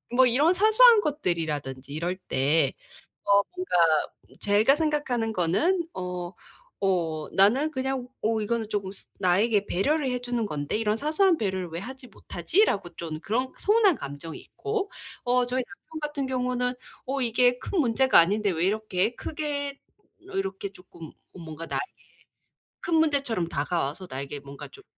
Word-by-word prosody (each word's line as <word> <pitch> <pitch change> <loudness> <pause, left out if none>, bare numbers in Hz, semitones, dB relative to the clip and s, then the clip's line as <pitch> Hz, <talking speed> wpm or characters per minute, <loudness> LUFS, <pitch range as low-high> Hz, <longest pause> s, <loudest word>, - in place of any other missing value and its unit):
뭐 260 0 +6
이런 290 +9 +4
사소한 435 +3 +6
것들이라든지 150 - -2
이럴 170 +5 -2
때 145 -4 +1 0.5
어 200 0 +5
뭔가 365 0 -5 0.7
제가 210 +6 +4
생각하는 290 -8 0
거는 300 - +1
어 180 -1 -5 0.5
어 165 -5 0
나는 250 +11 +4
그냥 260 -2 -2
어 220 0 +1
이거는 220 0 -2
쪼금 200 -3 -2
스 195 - -12
나에게 200 +3 +2
배려를 270 - +1
해주는 245 -2 -2
건데 145 -5 -3
'이런 215 -1 +1
사소한 320 - +2
배려를 190 -4 -2
왜 165 +1 -5
하지 260 +4 -9
못하지?'라고 200 - 0
좀 160 -2 -5
그런 250 +7 -1
서운한 415 -4 +4
감정이 145 - -7
있고 415 -1 -4 0.3
어 245 0 +2
저희 250 +1 -1
남편 310 +9 -11
같은 295 -2 -2
경우는 250 -1 -1 0.3
'어 270 +1 -2
이게 245 +1 +3
큰 375 - -2
문제가 260 - +4
아닌데 200 +4 +2
왜 170 +1 0
이렇게 215 +1 0
크게 285 -2 -4 0.4
이렇게 195 0 -4
쪼끔 170 -4 -12 0.2
뭔가 165 -2 -8
나에게 390 - -2 1.0
큰 340 - 0
문제처럼 280 - +1
다가와서 150 +3 -2
나에게 140 +2 -5
뭔가 140 0 -10
좀 410 - -16
225 Hz, 305 characters per minute, -26 LUFS, 180-280 Hz, 1.0 s, 뭐